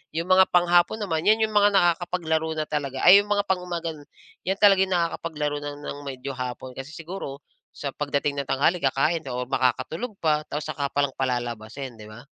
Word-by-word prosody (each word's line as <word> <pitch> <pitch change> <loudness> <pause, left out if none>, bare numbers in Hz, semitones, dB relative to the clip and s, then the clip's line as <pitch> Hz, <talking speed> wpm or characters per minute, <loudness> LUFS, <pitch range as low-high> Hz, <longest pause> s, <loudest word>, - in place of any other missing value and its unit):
Yung 165 +2 -2
mga 185 0 +6
panghapon 175 +4 +3
naman, 165 -6 -1
'yan 220 +1 +5
yung 215 - -9
mga 205 0 +6
nakakapaglaro 170 -3 +1
na 155 - -1
talaga, 140 -3 -3
ay, 185 +3 +10
yung 205 - -14
mga 205 0 +2
pang-umaga, 175 -3 -2 0.6
'yan 190 +1 +1
talaga 195 -2 +6
nakakapaglaro 165 -4 -1
na 145 0 -4
ng 145 0 -6
medyo 135 +1 -5
hapon 125 0 -6
kasi 135 +2 -7
siguro 165 -5 -7 0.4
sa 140 - -4
pagdating 145 0 -1
ng 140 - -10
tanghali 145 +7 +2
kakain 155 +4 +1
o 125 0 -3
makakatulog 155 - -1
pa, 150 -2 +2
tapos 150 +1 -3
saka 145 -2 -2
pa 145 - +1
lang 135 - -7
palalabasin, 120 -1 -4
'di 105 - -10
ba? 120 +4 -12
155 Hz, 185 wpm, -25 LUFS, 135-175 Hz, 0.6 s, ay